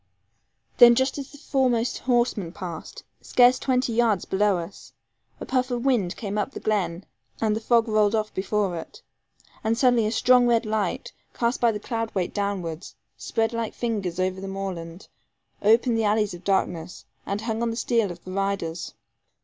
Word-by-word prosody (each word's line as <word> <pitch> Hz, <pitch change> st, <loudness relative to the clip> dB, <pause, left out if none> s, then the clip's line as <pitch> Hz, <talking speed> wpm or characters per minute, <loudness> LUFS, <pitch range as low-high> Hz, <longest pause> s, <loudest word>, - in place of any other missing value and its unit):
Then 240 Hz, -1 st, +9 dB
just 260 Hz, +3 st, 0 dB
as 275 Hz, -, -7 dB
the 290 Hz, -, -13 dB
foremost 255 Hz, -5 st, 0 dB
horseman 240 Hz, -8 st, 0 dB
passed, 180 Hz, -5 st, -8 dB, 0.2 s
scarce 250 Hz, 0 st, +4 dB
twenty 255 Hz, -2 st, 0 dB
yards 225 Hz, -5 st, +2 dB
below 200 Hz, 0 st, +2 dB
us, 170 Hz, +3 st, -9 dB, 0.5 s
a -, -, -6 dB
puff 255 Hz, 0 st, 0 dB
of 245 Hz, 0 st, -3 dB
wind 210 Hz, -9 st, +1 dB
came 210 Hz, -2 st, -3 dB
up 210 Hz, -, -1 dB
the -, -, -6 dB
glen, 190 Hz, -4 st, -1 dB, 0.3 s
and 215 Hz, -1 st, +1 dB
the -, -, -2 dB
fog 235 Hz, 0 st, +3 dB
rolled 215 Hz, -1 st, +2 dB
off 215 Hz, -1 st, -2 dB
before 195 Hz, -1 st, -1 dB
it. 160 Hz, -, -10 dB, 0.6 s
And 225 Hz, +1 st, +1 dB
suddenly 245 Hz, -3 st, +3 dB
a -, -, -1 dB
strong 250 Hz, +1 st, +4 dB
red 235 Hz, -1 st, +2 dB
light, 215 Hz, -, -2 dB, 0.2 s
cast 235 Hz, +1 st, 0 dB
by 235 Hz, -1 st, +4 dB
the 210 Hz, -, -4 dB
cloud 225 Hz, 0 st, -4 dB
weight 180 Hz, -2 st, -1 dB
downwards, 195 Hz, -4 st, -3 dB, 0.2 s
spread 225 Hz, 0 st, -1 dB
like 230 Hz, -1 st, -3 dB
fingers 200 Hz, -7 st, -2 dB
over 185 Hz, 0 st, -1 dB
the 195 Hz, -, -6 dB
moorland, 185 Hz, -2 st, -6 dB, 0.5 s
opened 225 Hz, +2 st, +3 dB
the -, -, +1 dB
alleys 210 Hz, -1 st, +1 dB
of 175 Hz, +1 st, -10 dB
darkness, 180 Hz, -3 st, -1 dB, 0.2 s
and 200 Hz, +1 st, -2 dB
hung 225 Hz, 0 st, -2 dB
on 235 Hz, -, 0 dB
the 225 Hz, -, -3 dB
steel 230 Hz, -3 st, +1 dB
of 175 Hz, 0 st, -11 dB
the 185 Hz, -, -8 dB
riders. 190 Hz, -4 st, -3 dB
215 Hz, 180 wpm, -25 LUFS, 195-235 Hz, 0.6 s, Then